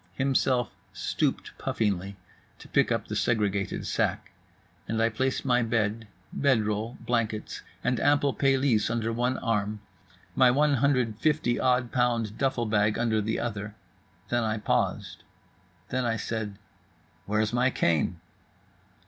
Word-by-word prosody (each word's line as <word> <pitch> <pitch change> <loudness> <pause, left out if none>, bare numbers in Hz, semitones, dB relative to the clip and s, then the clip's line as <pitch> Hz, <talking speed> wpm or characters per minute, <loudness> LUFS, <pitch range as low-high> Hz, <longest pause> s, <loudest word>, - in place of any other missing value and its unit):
Himself 130 -3 +1 0.2
stooped - - -2
puffingly 100 -2 -1 0.4
to - - -13
pick - - +2
up - - -1
the - - -4
segregated 105 -4 0
sack. - - -1 0.6
And 115 +1 -1
I 115 0 +3
placed 130 +5 -1
my 125 -2 +3
bed, 115 -1 -1 0.3
bed 130 -6 +2
roll, 110 +3 -2
blankets 115 -3 -2 0.2
and 125 - +1
ample 145 -1 +3
pelisse 135 -5 +2
under 115 0 -1
one 125 +2 0
arm, 105 -3 -1 0.6
my 130 -1 +6
150 135 -1 +2
odd 125 -1 +2
pound 120 -4 0
duffle 130 -3 +1
bag 105 0 +2
under 110 -2 +1
the 110 +2 -1
other; 105 -2 -4 0.5
then 120 -1 +1
I 110 0 0
paused. 105 - -1 0.7
Then 130 0 -1
I 115 -1 0
said, 105 -2 -4 0.7
"Where's 105 +2 0
my 125 +2 +3
cane?" 85 - +1
115 Hz, 130 wpm, -27 LUFS, 105-125 Hz, 0.7 s, my